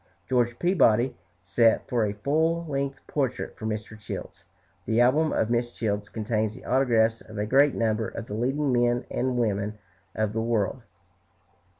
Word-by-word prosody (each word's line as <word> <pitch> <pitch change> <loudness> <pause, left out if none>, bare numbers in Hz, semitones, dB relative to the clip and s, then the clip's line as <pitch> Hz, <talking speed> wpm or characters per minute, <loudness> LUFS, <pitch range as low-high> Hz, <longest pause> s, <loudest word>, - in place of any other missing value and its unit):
George 120 -2 +1
Peabody 130 - +3 0.3
sat 115 +5 +3
for 120 -3 +1
a 100 - -2
full 160 +9 0
length 140 -2 -3
portrait 135 -4 -2
for 110 - -5
Mr. 110 0 -4
Childs. 105 - -7 0.4
The 115 +1 +2
album 145 +6 +4
of 110 - 0
Mrs. 120 0 0
Childs 105 -2 -2
contains 110 -1 -1
the - - -12
autographs 115 -3 +2
of 110 -1 -11
a 105 - 0
great 135 +4 +4
number 110 -1 0
of 115 - -6
the 105 - -7
leading 135 +6 0
men 120 0 +2
and 130 -1 -1
women 105 -2 -1 0.4
of 110 -1 -1
the 110 - -1
world. 115 +1 0
120 Hz, 165 wpm, -26 LUFS, 110-130 Hz, 0.4 s, album